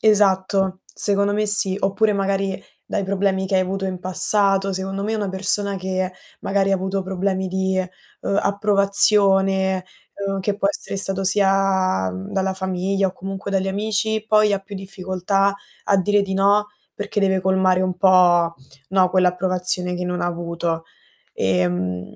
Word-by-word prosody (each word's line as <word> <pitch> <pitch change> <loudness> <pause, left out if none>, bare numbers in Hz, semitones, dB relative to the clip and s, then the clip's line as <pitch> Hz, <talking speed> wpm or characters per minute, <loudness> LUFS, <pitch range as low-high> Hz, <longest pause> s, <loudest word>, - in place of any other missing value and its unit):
Esatto, 195 -2 +2
secondo 200 0 0
me 210 +1 0
sì, 195 -2 +5
oppure 205 +2 +1
magari 195 -1 -1 0.2
dai 200 - -2
problemi 190 0 0
che 195 - -2
hai 185 - +4
avuto 195 +1 -2
in 185 -1 -4
passato, 195 +1 +1
secondo 190 +1 -4
me 220 +2 -1
una 205 -2 -2
persona 195 +1 -1
che 185 0 -2 0.3
magari 195 0 0
avuto 190 +1 -1
problemi 190 0 -2
di, 190 0 -1
ehm, 185 - -2 0.5
approvazione, 195 -2 +2 0.3
ehm, 195 -1 -3
che 200 +1 -1
può 200 -1 +1
essere 200 - -4
stato 195 0 -1
sia, 190 - +2
mhmm, 95 +1 -7
dalla 190 -1 0
famiglia 190 +1 -1
o - - -8
comunque 195 +1 -6
dagli 195 -1 0
amici, 215 +2 -1
poi 215 -1 +4
ha 200 - +1
più 195 +1 -11
difficoltà 195 0 -1 0.3
a 200 - +3
dire 205 +2 +2
di 190 -1 -3
no, 200 +2 +3 0.3
perché 205 0 -3
deve 190 -1 +2
colmare 190 0 +2
un 185 -1 -1
po', 175 -3 +4 0.3
no, 190 -1 +3
quell'approvazione 180 0 0
che 180 0 -4
non 180 0 -3
avuto, 170 -1 -3 0.5
ehm 90 -1 -1
190 Hz, 150 wpm, -21 LUFS, 185-200 Hz, 0.5 s, sì